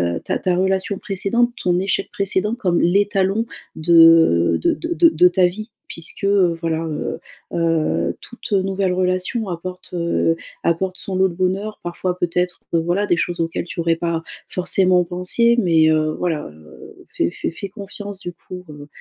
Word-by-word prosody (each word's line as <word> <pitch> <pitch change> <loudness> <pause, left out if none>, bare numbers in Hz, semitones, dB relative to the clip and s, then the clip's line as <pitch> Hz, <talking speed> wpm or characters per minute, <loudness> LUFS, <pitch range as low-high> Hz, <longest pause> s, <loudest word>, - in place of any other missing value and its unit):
heu, - - -3
ta - - -1
ta 180 -1 0
relation 190 +1 0
précédente, 205 +5 0
ton 180 0 +1
échec 190 +1 -1
précédent, 200 +2 0
comme 180 -8 0
l'étalon 200 +3 +2 0.3
de 165 - +5
de - - +2
de 335 0 +2
de 180 - +5
ta 180 +1 +3
vie 215 +6 -3 0.2
puisque, 170 +4 -6
heu, 185 -4 +3
voilà, 165 0 -1
heu, 155 -2 -4 0.3
heu, 155 - 0
toute 240 -1 -10
nouvelle 195 -1 +1
relation 185 +5 -1
apporte, 180 +1 -7
heu, 170 -1 +1 0.3
apporte 185 +2 0
son 190 - -4
lot 190 0 +3
de 175 - -8
bonheur. 190 +4 -2
Parfois, 180 +1 -3
peut-être, 180 +1 -1
heu, 165 - +4
voilà 175 +5 0
des - - +3
choses 175 0 -2
auxquelles 165 0 -2
tu 175 - -8
aurais 165 0 +2
pas 165 -1 -2 0.3
forcément 180 0 +3
pensé 180 +7 +2
mais, 165 -5 +4
heu, 155 0 +2
voilà, 160 -4 -2
heu, 75 0 -15
fais 85 - 0
fais - - -4
fais 195 +4 -7
confiance 200 -1 -8
du 175 -3 -7
coup 180 +1 -11
heu, 145 -1 -10
180 Hz, 170 wpm, -20 LUFS, 165-195 Hz, 0.3 s, de